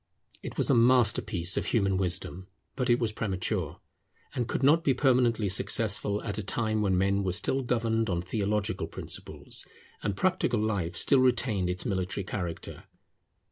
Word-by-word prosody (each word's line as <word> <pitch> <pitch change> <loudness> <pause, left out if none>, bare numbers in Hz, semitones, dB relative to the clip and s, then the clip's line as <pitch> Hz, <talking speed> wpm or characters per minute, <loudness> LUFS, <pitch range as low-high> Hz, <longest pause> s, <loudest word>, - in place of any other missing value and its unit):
It - - -8
was - - +2
a - - +4
masterpiece 115 -7 +3
of - - -1
human 100 -4 +1
wisdom; 95 0 -2 0.3
but 125 -1 -1
it 120 - +5
was 115 -3 -1
premature, 95 -5 -2 0.5
and 125 -4 -2
could 130 - -2
not 155 +5 +4
be 135 -5 +2
permanently 120 -5 +2
successful 100 +1 +1
at 105 -2 -3
a - - -2
time 110 +1 -1
when 95 -3 +1
men 100 +1 +1
were 90 -2 -1
still 130 +8 +1
governed 115 -3 0
on 85 -1 -1
theological 105 +2 -2
principles, - - -4 0.4
and 100 -2 -3
practical 185 - +1
life 100 -6 -1
still 140 - +4
retained 120 -7 +1
its 90 0 -1
military 95 -2 -2
character. 90 -3 -6
105 Hz, 160 wpm, -28 LUFS, 95-120 Hz, 0.5 s, it